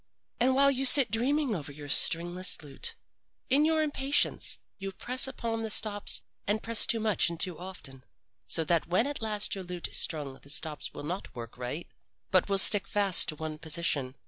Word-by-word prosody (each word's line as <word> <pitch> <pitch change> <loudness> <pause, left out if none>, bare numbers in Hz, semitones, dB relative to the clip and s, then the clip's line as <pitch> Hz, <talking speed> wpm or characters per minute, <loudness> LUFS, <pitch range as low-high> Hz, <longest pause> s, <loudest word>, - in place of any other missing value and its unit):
And 260 +2 +1
while 280 +1 +3
you 270 0 -3
sit 265 -4 +8
dreaming 265 +3 -1
over 145 -7 -6
your 145 0 -11
stringless 175 +4 +3
lute, 140 -2 -6 0.6
in 290 +3 +3
your 315 0 0
impatience 285 -1 0 0.2
you 195 0 -6
press 250 +7 +2
upon 230 -3 -5
the 220 - -4
stops 210 -1 +2 0.2
and 210 +2 -1
press 230 -1 +1
too 230 - 0
much 215 -6 0
and 170 -1 -9
too 180 -3 -3
often, 155 -8 -10 0.4
so 165 - 0
that 165 0 -1
when 185 +7 0
at 285 -2 -5
last 210 -2 -2
your 195 - -6
lute 180 -1 -6
is - - -4
strung 145 -4 -2
the 140 - -16
stops 150 +1 -4
will - - -11
not 180 +6 -7
work 115 -2 -10
right, 125 +7 -7 0.4
but 185 +1 +1
will 195 - 0
stick 200 +1 +6
fast 200 -5 +3
in 155 - -14
one 155 0 -7
position. 155 -4 -2
190 Hz, 195 wpm, -27 LUFS, 160-230 Hz, 0.6 s, sit